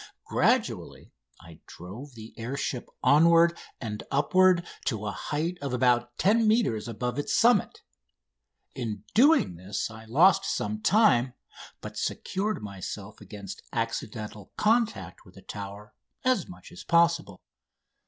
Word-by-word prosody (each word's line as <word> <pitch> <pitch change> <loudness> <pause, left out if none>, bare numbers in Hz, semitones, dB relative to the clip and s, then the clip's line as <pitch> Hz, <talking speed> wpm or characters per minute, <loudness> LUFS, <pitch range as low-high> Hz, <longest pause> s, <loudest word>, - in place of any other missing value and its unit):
Gradually - - 0 0.3
I 85 -2 -14
drove 115 - -10
the 110 0 -11
air 120 +4 -5
ship 125 -3 -4
onward 170 +3 +5 0.2
and 105 -4 -5
upward 175 +5 +3 0.2
to 110 -5 -2
a 105 - -2
height 165 - -3
of 140 -3 -3
about 120 -1 +1
10 220 +3 +3
metres 210 - +1
above 125 +4 -3
its 145 - -1
summit. 235 -4 +3 0.9
In 110 -5 -5
doing 270 - +4
this 100 +5 -4
I 110 0 -11
lost 180 +12 +4
some 105 - -2
time, 135 - +3 0.5
but - - -8
secured 200 - -2
myself 100 +1 -7
against 100 -3 -9
accidental 105 -2 -4
contact 225 +1 0
with - - -19
the - - -14
Tower 100 0 -8 0.3
as 255 -1 +2
much 180 - -13
as 180 - -10
possible. 170 - +2
125 Hz, 130 wpm, -27 LUFS, -, 0.9 s, onward